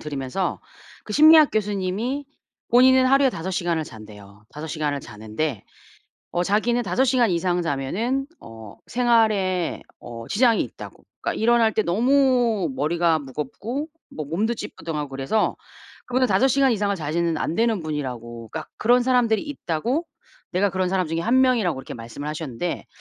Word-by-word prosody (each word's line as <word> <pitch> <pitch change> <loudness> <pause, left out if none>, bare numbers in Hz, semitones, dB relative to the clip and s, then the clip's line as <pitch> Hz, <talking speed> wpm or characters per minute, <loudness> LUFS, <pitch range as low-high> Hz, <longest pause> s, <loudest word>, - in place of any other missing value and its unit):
들으면서 145 +4 -3 0.4
그 210 - -7
심리학 310 +1 +7
교수님이 210 +6 -2 0.5
본인은 255 +1 +6
하루에 275 0 +4
5 180 -3 -5
시간을 170 -3 -1
잔대요. 105 -3 -13
5 150 +2 -8
시간을 150 -2 -2
자는데 110 +2 -4 0.7
어 175 - 0
자기는 225 +5 +1
5 250 +5 +1
시간 250 -3 +3
이상 175 +1 0
자면은 180 - -1
어 110 -2 -11
생활에 215 -7 +1 0.2
어 115 -1 -9
지장이 230 0 +3
있다고. - - -9 0.2
그러니까 - - -2
일어날 230 -1 +4
때 215 - +2
너무 240 - +2
머리가 165 +3 +1
무겁고 155 - -5 0.3
뭐 155 - -4
몸도 200 +11 -1
찌뿌둥하고 160 -9 -5
그래서 135 +11 -1 0.5
그분은 255 +1 +2
5 265 +1 +3
시간 270 0 +3
이상을 205 -2 0
자시는 165 +1 -1
안 160 - -2
되는 225 -2 +1
분이라고. 120 -6 -5
그러니까 160 -1 -6
그런 245 +3 +4
사람들이 245 -4 +2
있다고. 265 - -2 0.5
내가 195 +2 +2
그런 185 0 -1
사람 185 -2 0
중에 165 +1 -2
1 240 +9 +3
명이라고 220 - +2
이렇게 - - -9
말씀을 120 +5 -7
하셨는데 155 +1 -4
185 Hz, 345 characters per minute, -23 LUFS, 150-240 Hz, 0.7 s, 심리학